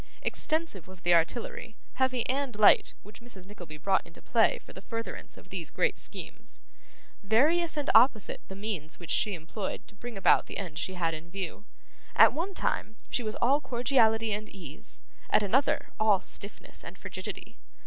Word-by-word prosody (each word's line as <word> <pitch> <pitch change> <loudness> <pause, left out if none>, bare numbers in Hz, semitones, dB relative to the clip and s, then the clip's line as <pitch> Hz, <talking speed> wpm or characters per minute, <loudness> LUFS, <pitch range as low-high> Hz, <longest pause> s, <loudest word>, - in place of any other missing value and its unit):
Extensive 315 - 0
was 185 -1 -12
the 175 0 +3
artillery, 220 +6 0 0.2
heavy 255 -2 +1
and 270 -2 -1
light, 210 0 +6
which 210 +3 -13
Mrs. 220 -7 -8
Nickleby 175 -6 -10
brought 190 +5 +2
into 170 - -15
play 225 -2 +3
for - - -14
the 190 - -10
furtherance 230 +2 -6
of - - -15
these - - -5
great - - +1
schemes; - - -5 0.6
various 305 - +3
and 290 - -1
opposite 225 -2 +4
the 190 - -8
means 195 -7 -4
which 170 -3 -6
she 205 -3 +2
employed 175 +5 -5
to - - -17
bring 230 +1 -8
about 195 - +4
the - - -6
end 170 -6 -5
she 185 +2 -3
had 165 -2 0
in 160 +2 -7
view. 195 +2 -5 0.5
At - - +8
one 365 +5 -3
time, 220 - -1 0.2
she - - +1
was 215 -2 -3
all 275 +5 +4
cordiality 225 -4 +2
and 215 +1 -4
ease; 165 -7 -12 0.3
at - - +4
another, 260 +8 +1
all 215 -3 +4
stiffness 200 +2 -5
and - - -9
frigidity. - - -7
215 Hz, 175 wpm, -29 LUFS, 185-245 Hz, 0.6 s, At